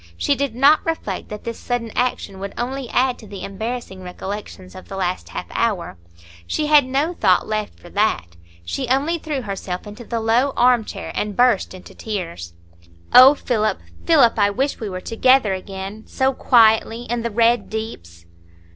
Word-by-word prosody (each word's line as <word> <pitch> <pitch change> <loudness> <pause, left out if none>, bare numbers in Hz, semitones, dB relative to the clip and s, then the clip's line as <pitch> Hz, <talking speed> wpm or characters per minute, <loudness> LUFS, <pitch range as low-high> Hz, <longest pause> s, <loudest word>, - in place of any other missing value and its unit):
She 285 - +1
did 280 -4 -2
not 280 +5 +5
reflect 320 - -4
that 210 0 -7
this 230 -1 -6
sudden 240 -2 -3
action 245 -6 -2
would 200 +1 -6
only 260 +1 -4
add 255 0 +1
to 215 - -12
the 195 -2 -8
embarrassing 220 -1 -5
recollections 185 +1 -7
of 185 - -12
the 195 - -7
last 185 -1 -2
half - - -5
hour. 210 - -1 0.5
She 300 - -1
had 300 -2 +5
no 285 +6 0
thought 185 - +2
left 215 -1 -3
for 175 - -14
that. 90 - 0 0.3
She 260 - -3
only 285 +7 +1
threw 295 -5 -4
herself 195 -3 -5
into 210 +3 -9
the 230 0 -3
low 235 +5 +2
arm 245 -2 +4
chair, - - -7
and 210 -2 -3
burst 240 -6 +2
into 185 - -13
tears. 170 - -6 0.6
"Oh, 260 +3 +9
Philip, 220 -6 -1 0.3
Philip, 275 -10 +4
I 205 0 +4
wish 265 +7 -1
we 215 - -4
were 185 -1 -5
together 230 0 +3
again—so 195 +7 -3
quietly—in 230 0 +3
the 235 - -2
Red 230 0 +2
Deeps." 85 - -7
225 Hz, 170 wpm, -21 LUFS, 195-255 Hz, 0.6 s, Oh